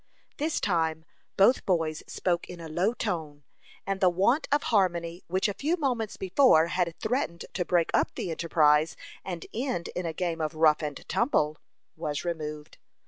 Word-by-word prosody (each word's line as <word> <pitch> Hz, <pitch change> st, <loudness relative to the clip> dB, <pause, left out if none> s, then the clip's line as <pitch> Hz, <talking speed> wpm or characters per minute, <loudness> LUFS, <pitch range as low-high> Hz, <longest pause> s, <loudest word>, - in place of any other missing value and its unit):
This 310 Hz, +2 st, 0 dB
time, 160 Hz, -4 st, 0 dB, 0.3 s
both 205 Hz, +6 st, +5 dB
boys 160 Hz, -4 st, 0 dB
spoke 175 Hz, -2 st, -1 dB
in 180 Hz, -, -8 dB
a 165 Hz, -, -7 dB
low 180 Hz, +9 st, 0 dB
tone, 160 Hz, -10 st, -4 dB, 0.4 s
and 195 Hz, 0 st, -2 dB
the 185 Hz, -, +6 dB
want 200 Hz, -, +2 dB
of 290 Hz, +1 st, +2 dB
harmony 175 Hz, -3 st, +1 dB
which 185 Hz, +4 st, +1 dB
a 205 Hz, -, -2 dB
few 315 Hz, -, -1 dB
moments 245 Hz, -, -1 dB
before 185 Hz, -, +4 dB
had 175 Hz, -2 st, 0 dB
threatened 220 Hz, -, -2 dB
to 180 Hz, -, 0 dB
break 175 Hz, -1 st, +1 dB
up -, -, +1 dB
the 175 Hz, -, -3 dB
enterprise, 155 Hz, -1 st, +3 dB, 0.3 s
and 175 Hz, -4 st, -5 dB
end 240 Hz, -8 st, -2 dB
in 180 Hz, -1 st, -4 dB
a -, -, -1 dB
game 165 Hz, -1 st, -2 dB
of 155 Hz, +1 st, -2 dB
rough 155 Hz, -1 st, +4 dB
and 150 Hz, -2 st, -5 dB
tumble, 155 Hz, -, +1 dB, 0.4 s
was 150 Hz, -1 st, -3 dB
removed. 150 Hz, -3 st, -5 dB
175 Hz, 170 wpm, -28 LUFS, 160-195 Hz, 0.4 s, the